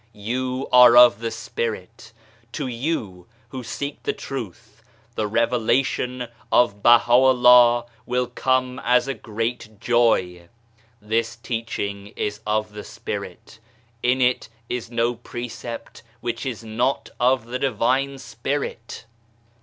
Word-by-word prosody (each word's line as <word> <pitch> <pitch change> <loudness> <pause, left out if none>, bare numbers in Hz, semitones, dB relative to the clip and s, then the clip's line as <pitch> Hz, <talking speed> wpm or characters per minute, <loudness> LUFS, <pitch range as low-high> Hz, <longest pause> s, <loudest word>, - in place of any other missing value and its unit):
You 125 +5 -3
are 125 -1 +8
of 120 -4 +8
the 115 0 -2
Spirit! 110 0 -5 0.4
To 145 - -3
you 115 - -4 0.2
who 130 +1 -6
seek 140 +4 -5
the - - -2
Truth, 110 -3 -8 0.3
the 110 -2 -2
Revelation 125 +2 0 0.2
of 105 -4 +3
BahaVllah 120 0 +6 0.2
will 125 0 0
come 130 +1 -1
as 125 +1 +3
a 135 - -1
great 115 -2 -5
joy! 95 -8 +1 0.5
This 115 +2 -1
teaching 115 -4 -5
is 105 0 -3
of 105 0 -1
the 105 0 -7
spirit, - - -7 0.4
in 125 +2 +1
it 125 -2 +1 0.2
is 125 -2 -4
no 120 0 0
precept 120 0 -8 0.2
which 120 +3 -4
is 115 -3 -5
not 120 +5 -1
of 125 -1 +2
the 125 +2 -4
Divine 135 +2 0
Spirit. 135 -4 -5
120 Hz, 120 wpm, -23 LUFS, 110-125 Hz, 0.5 s, are